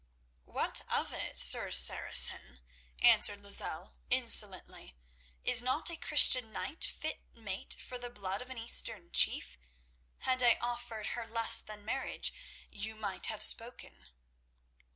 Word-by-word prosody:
"What - - 0
of - - -5
it, - - -7
Sir - - +7
Saracen?" 60 0 +4 0.4
answered 205 0 +4
Lozelle, 200 - -2 0.2
insolently. 65 - +2 0.5
"Is - - +4
not 260 +7 -2
a - - -8
Christian 255 -7 +2
knight 305 +9 -7
fit 310 - -6
mate 200 -5 -7
for 250 - -10
the 245 0 -9
blood 200 -3 -8
of 250 - -14
an 260 - -10
Eastern 225 -5 +2
chief? - - -1 0.6
Had 255 -1 -2
I 240 -2 +2
offered 240 -3 -8
her 235 -2 -9
less 230 0 0
than 210 -1 -14
marriage, 265 +4 -5 0.4
you 220 +2 -8
might 205 -3 -8
have 220 - -2
spoken." 230 - -2
225 Hz, 130 wpm, -29 LUFS, 205-245 Hz, 0.6 s, Sir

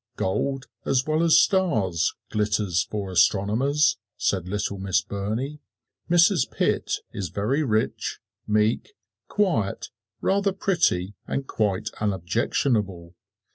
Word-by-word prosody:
"Gold, 135 +8 -1 0.2
as 130 0 +1
well 155 +1 +1
as 165 -1 +5
stars, 110 - +2 0.2
glitters 105 -4 0
for 100 -3 -4
astronomers," 110 - +3 0.2
said 90 -2 0
little 100 0 -2
Miss 95 -1 +1
Burney. 110 +10 -3 0.5
"Mrs. 175 +2 +4
Pitt - - 0 0.2
is 95 -4 -4
very 110 - 0
rich, 110 -6 -1 0.3
meek, 105 - +1 0.3
quiet, 170 - 0 0.3
rather 200 0 +1
pretty 130 - +1
and 135 - -2
quite 105 -7 -1
unobjectionable." 95 -1 -1
105 Hz, 105 wpm, -25 LUFS, 95-145 Hz, 0.5 s, as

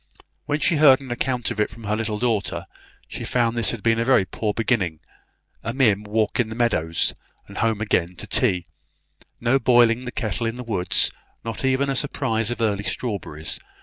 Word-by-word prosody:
When 150 0 0
she 160 - +2
heard 140 -3 +7
an 135 -2 -9
account 125 0 -1
of - - -5
it 105 - +2
from 115 +2 -13
her 105 0 0
little 110 -1 -2
daughter, 115 -3 -1 0.4
she - - -7
found 120 -2 +1
this 115 -2 +1
had 115 -4 -4
been 115 0 +3
a - - +2
very 125 -6 +4
poor 105 +2 -2
beginning, 105 -8 0 0.6
a 115 +2 -4
mere 120 -7 +4
walk 105 +2 -1
in 115 -2 +1
the 110 - -6
meadows, 85 -9 +1 0.3
and - - -8
home 115 -2 +1
again 90 -4 0
to 105 - -6
tea; 95 -4 +1 0.7
no 125 +3 +2
boiling 120 0 +4
the 125 - -4
kettle 115 -1 -2
in 115 - -3
the 125 - -6
woods, 95 -6 +1 0.3
not 115 +2 -4
even 135 +1 +2
a 135 - 0
surprise 115 -5 0
of 120 -1 -3
early 100 -3 +1
strawberries. 100 -10 -3
115 Hz, 195 wpm, -23 LUFS, 105-125 Hz, 0.7 s, heard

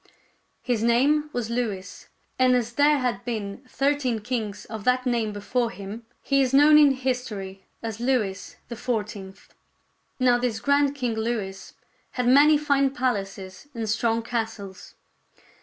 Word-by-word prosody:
His 245 -4 0
name 280 +6 +2
was 235 -3 -3
Louis, 220 -6 -4 0.3
and 255 -1 +5
as 240 -1 -1
there 290 +3 +4
had 245 -7 -2
been 220 -1 -5
thirteen 275 -4 0
kings 215 -3 -4
of 220 -1 -7
that 250 +2 +2
name 235 -4 0
before 230 +4 -1
him, 220 +1 -9 0.2
he 275 0 +2
is 265 0 +1
known 300 +2 +7
in 290 -2 +6
history 230 -8 -4 0.2
as 225 -1 -5
Louis 235 -6 -1
the 235 - -6
Fourteenth. 210 -5 -5 0.7
Now 245 -1 +4
this 240 -3 -1
grand 285 +2 +2
King 250 -5 -2
Louis 220 -4 -4 0.4
had 250 -1 -1
many 290 +4 +6
fine 280 -2 +2
palaces 195 -3 -3
and 225 -1 -3
'strong 225 +1 0
castles. 225 -5 -5
240 Hz, 140 wpm, -25 LUFS, 210-260 Hz, 0.7 s, known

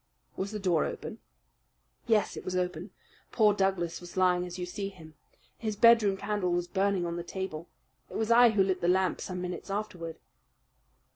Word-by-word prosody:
"Was 195 - -3
the 215 - -4
door 180 -6 +2
open?" - - -6 0.9
"Yes, 220 -3 +2
it - - -7
was 185 - -4
open. 180 +1 -2 0.4
Poor 215 -3 +4
Douglas 190 -4 0
was 175 +1 -11
lying 180 -1 +3
as 175 +1 -7
you 180 - -3
see 195 +2 -4
him. 160 -5 -14 0.5
His 215 -2 -2
bedroom 220 -3 +5
candle 200 -2 -1
was 175 0 0
burning 195 -1 0
on 170 0 -3
the 175 - -4
table. 175 -3 -5 0.4
It - - -5
was 220 +1 0
I 240 +1 +8
who 210 -3 +3
lit 190 -1 -1
the 170 - +1
lamp 185 0 +2
some 180 -1 -4
minutes 180 +1 -5
afterward." 180 -5 -4
185 Hz, 185 wpm, -29 LUFS, 175-205 Hz, 0.9 s, I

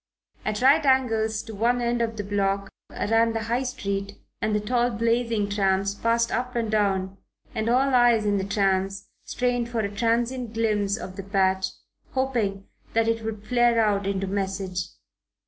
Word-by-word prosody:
At 215 +2 -2
right 285 +4 +6
angles 225 -5 +2
to 225 - -9
one 235 +4 +1
end 240 0 0
of 225 -1 -2
the 205 - -3
block 200 0 -1 0.2
ran 225 +2 +1
the 225 -1 -2
High 235 +3 0
Street 200 -6 -3 0.3
and 215 - 0
the - - +2
tall, 240 +3 +1
blazing 230 -2 0
trams 195 -1 +1
passed 230 +2 +1
up 250 +1 -2
and 230 -2 -1
down 195 -3 0 0.4
and 220 +1 -1
all 265 +3 +3
eyes 240 -3 +4
in 205 -1 +2
the - - -2
trams 195 -1 0 0.2
strained 245 -1 -1
for 235 -2 -1
a 200 -1 -4
transient 235 +1 0
glimpse 210 -3 +1
of 185 -2 -8
the 195 - -5
patch, 190 -1 +1 0.5
hoping 230 -7 -1 0.3
that 225 0 +3
it 225 0 0
would 215 -1 -5
flare 240 -1 +3
out 205 -3 +2
into 195 -1 -1
message. 190 -2 -2
220 Hz, 170 wpm, -25 LUFS, 200-235 Hz, 0.5 s, right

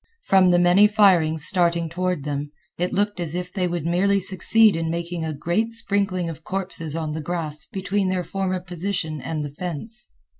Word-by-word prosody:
From 190 -1 +4
the 175 - +4
many 175 +4 +5
firings 175 -7 +3
starting 170 -2 +3
toward 180 -2 -2
them, 145 0 -4 0.3
it 180 +1 -1
looked 205 0 -1
as 170 -2 -2
if 180 0 -5
they 185 -2 -1
would 175 -3 -4
merely 195 +4 +2
succeed 200 +3 +4
in 165 0 -2
making 170 0 -4
a 160 - -3
great 175 +10 -1
sprinkling 200 -5 +1
of 160 -1 -8
corpses 180 -5 -3
on 160 -2 -3
the 155 +1 -4
grass 155 -2 -4
between 195 0 -2
their 185 -1 -1
former 185 +1 -2
position 175 -3 -4
and 155 0 -4
the - - -5
fence. 180 +7 -7
175 Hz, 185 wpm, -23 LUFS, 160-195 Hz, 0.3 s, many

